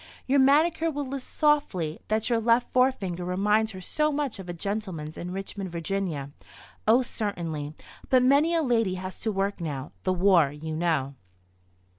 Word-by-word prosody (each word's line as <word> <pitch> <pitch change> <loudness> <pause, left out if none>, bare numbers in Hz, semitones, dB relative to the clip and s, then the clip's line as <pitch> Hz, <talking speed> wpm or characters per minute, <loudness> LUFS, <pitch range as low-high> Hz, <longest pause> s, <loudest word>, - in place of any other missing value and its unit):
Your 275 +2 +3
manicure 315 +5 +4
will 290 -2 -3
lisp 270 -1 -5
softly 210 - +1
that 215 0 0
your 235 -2 +2
left 230 +2 +2
forefinger 210 -9 +1
reminds 210 +4 +1
her 185 - -8
so 305 - 0
much 285 -7 -2
of 185 -2 -8
a - - -1
gentleman's 175 -4 -4
in 175 - -6
Richmond, 195 +1 -5
Va. 170 -4 -3 0.6
Oh, 240 +4 +5
certainly; 165 -10 -4 0.3
but 255 -1 +5
many 290 +6 +4
a 325 - +2
lady 225 -8 +1
has 185 0 -7
to 220 - -1
work 195 -1 -1
now—the 150 +4 -3
war, 180 -6 +4
you 155 +2 -6
know. 155 -5 0
195 Hz, 160 wpm, -27 LUFS, 170-255 Hz, 0.6 s, Oh